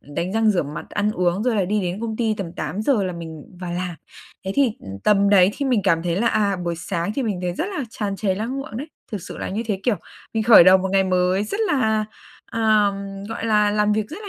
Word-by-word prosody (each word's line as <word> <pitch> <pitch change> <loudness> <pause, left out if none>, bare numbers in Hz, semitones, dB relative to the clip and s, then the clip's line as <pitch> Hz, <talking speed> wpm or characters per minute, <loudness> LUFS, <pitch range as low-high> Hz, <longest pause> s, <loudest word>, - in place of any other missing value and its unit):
đánh 170 +6 -4
răng 225 0 +3
rửa 190 -4 +1
mặt, 145 +1 -8
ăn 210 0 0
uống, 180 +1 0
rồi 235 -2 +1
là 195 - +2
đi 210 +3 0
đến 180 +2 -3
công 225 -1 -3
ty 225 -2 0
tầm 190 -5 -6
8:00 210 - 0
là 185 - -2
mình 160 -3 -8 0.2
vào 175 -1 -4
làm. 180 0 -3 0.5
Thế 190 - -2
thì, 275 -5 +3
ừm, 95 0 -8
tầm 200 -1 +4
đấy 190 -2 +6
thì 280 - -2
mình 245 -5 +2
cảm 165 -4 +2
thấy 170 -1 -1
là, 230 +4 +1
à, 205 -3 +2
buổi 170 -1 -2
sáng 170 +3 -3
thì 275 - -1
mình 210 -6 -2
thấy 180 -1 -2
rất 330 - -2
là 290 - -2
tràn 205 -3 -3
trề 195 -2 0
lăng 225 +7 -3
lượng 275 -5 -6
đấy, 280 - -5 0.3
thực 205 -4 -4
sự - - -8
là - - -4
như 210 +4 -2
thế, 200 -4 -2
kiểu, 240 -5 +1 0.4
mình 220 - +1
khởi 220 -5 +8
đầu 185 +1 +7
một 190 - -2
ngày 195 -1 +4
mới 185 +2 +1
rất 405 - -4
là, 220 - +1 0.4
à, 220 -2 +2
ừm, 195 0 -5
gọi 225 +2 -5
là, 210 -2 +3
làm 210 0 +2
việc 215 0 0
rất 325 - -7
là 410 - -7
205 Hz, 265 wpm, -22 LUFS, 180-220 Hz, 0.5 s, khởi